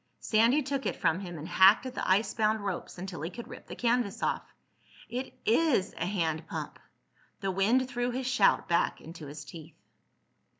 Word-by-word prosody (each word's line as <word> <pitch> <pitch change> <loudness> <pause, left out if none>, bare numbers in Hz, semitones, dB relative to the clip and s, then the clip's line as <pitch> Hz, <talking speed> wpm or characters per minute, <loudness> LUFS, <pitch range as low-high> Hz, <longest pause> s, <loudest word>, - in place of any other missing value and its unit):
Sandy 235 +7 +3
took 275 0 -2
it - - -1
from 165 0 +1
him 175 -4 -7
and 155 +2 -7
hacked 190 +7 +6
at 255 - -5
the - - -3
icebound 215 +2 +2
ropes 195 -3 -4
until 180 -2 -6
he 165 - -3
could 235 +6 -9
rip - - -11
the - - -7
canvas 235 -4 0
off. - - +1 0.7
"It 250 +3 -4
is 235 - +2
a - - -3
hand 165 -4 -1
pump!" - - -6 0.6
The 195 -1 0
wind 225 +7 +2
threw 245 -1 -1
his 255 +1 -3
shout 255 0 +3
back 170 -1 +1
into 160 -2 -10
his 145 +1 -8
teeth. 160 +1 -11
200 Hz, 180 wpm, -30 LUFS, 170-245 Hz, 0.7 s, hacked